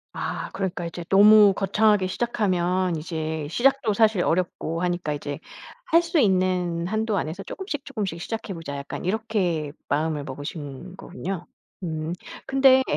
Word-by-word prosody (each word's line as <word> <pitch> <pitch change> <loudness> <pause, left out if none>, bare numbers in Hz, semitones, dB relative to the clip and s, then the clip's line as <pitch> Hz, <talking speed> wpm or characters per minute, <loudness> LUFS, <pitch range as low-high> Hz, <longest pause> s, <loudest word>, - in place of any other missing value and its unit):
아. - - -3
그러니까 185 -3 -3
이제 170 +1 -6
너무 205 +1 +8
거창하게 205 0 +3
시작하면 185 -5 0
이제 160 -1 -3
시작도 250 - +2
사실 215 -3 +3
어렵고 170 -1 -1
하니까 175 -4 -1
이제 145 -1 -5 0.5
할 335 +1 +5
수 335 -1 0
있는 185 -5 +2
한도 215 +1 0
안에서 165 +6 -4
'쪼금씩 310 - -5
쪼금씩 205 -10 -3
시작해 220 0 -4
보자.' 150 -4 -6
약간 140 +4 -6
이렇게 185 -8 0 0.2
마음을 150 0 0
먹으신 145 +4 -7
거군요. 185 -1 -5 0.4
음. 160 -1 -3 0.3
근데 265 -1 +6
185 Hz, 320 characters per minute, -25 LUFS, 165-215 Hz, 0.5 s, 너무